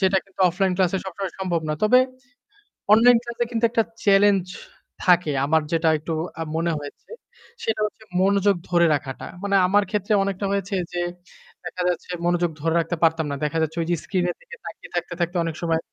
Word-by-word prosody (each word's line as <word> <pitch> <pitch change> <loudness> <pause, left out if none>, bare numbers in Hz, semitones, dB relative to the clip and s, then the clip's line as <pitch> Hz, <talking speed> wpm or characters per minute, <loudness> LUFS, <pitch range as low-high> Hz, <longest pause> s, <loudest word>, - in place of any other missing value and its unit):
যেটা 190 0 +3
কিন্তু 195 -1 -14
অফলাইন 190 +2 0
ক্লাসে 190 0 +2
সবসময় 190 -1 -5
সম্ভব 180 -3 -1
না। 155 - 0
তবে 230 +4 +6 1.0
অনলাইন 235 +2 +7
ক্লাসে 235 0 -2
কিন্তু 230 0 -2
একটা 225 0 +2 0.2
challenge 195 -2 +4 0.5
থাকে 175 -4 +4
আমার 160 +2 +3
যেটা 165 -1 +2
একটু 155 +2 -5 0.3
আ - - -2
মনে 165 +1 0
হয়েছে। 145 -1 -11 0.5
সেটা 220 -1 -1
হচ্ছে 215 +1 -7 0.2
মনোযোগ 200 +1 +3
ধরে 175 -1 +4
রাখাটা। 135 -2 -6 0.2
মানে 200 0 +1
আমার 205 +2 +3
ক্ষেত্রে 210 0 -1
অনেকটা 200 0 -2
হয়েছে 200 0 -1 0.2
যে, 175 - -1 0.6
দেখা 180 +1 -5
যাচ্ছে 180 0 -3
মনোযোগ 175 -1 +1
ধরে 165 +1 0
রাখতে 165 +1 -1
পারতাম 165 -1 +3
না। - - -2
দেখা 150 +2 -2
যাচ্ছে 160 +1 -2
যে 175 - +3
screen 185 -3 -1
এর 175 - -3
দিকে - - -12
তাকিয়ে - - -9
থাকতে, 175 0 -2
থাকতে 175 +1 -1
অনেক 165 -1 -3
সময় 165 -1 +1
180 Hz, 185 wpm, -23 LUFS, 165-200 Hz, 1.0 s, অনলাইন